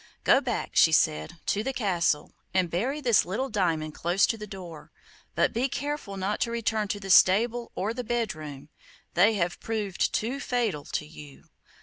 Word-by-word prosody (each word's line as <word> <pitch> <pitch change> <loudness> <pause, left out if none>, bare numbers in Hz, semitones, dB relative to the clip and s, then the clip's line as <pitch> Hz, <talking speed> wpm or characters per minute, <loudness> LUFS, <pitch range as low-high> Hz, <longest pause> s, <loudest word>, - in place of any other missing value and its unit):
'Go - - +5
back,' - - -3
she - - +6
said, 75 - +1
'to 210 - 0
the 270 +2 -2
castle, 180 -10 0 0.2
and 180 -3 +2
bury 260 - -1
this 240 -6 +4
little 215 +10 -3
diamond 165 -7 0
close 175 +5 +2
to - - -1
the 210 -1 -8
door. 175 -6 -10 0.4
But - - +2
be 250 +4 0
careful 285 -8 -4
not 195 +2 -2
to - - 0
return 225 -2 -1
to 205 0 -3
the 195 -1 -4
stable 230 +6 +4
or 200 - -1
to - - -2
the 250 - -2
bedroom; 155 - -4 0.4
they 205 +6 +4
have 175 -3 -1
proved 210 -4 -1
too 245 +6 -2
fatal 230 - -1
to - - -3
you. 150 -2 -13
200 Hz, 185 wpm, -27 LUFS, 170-235 Hz, 0.4 s, she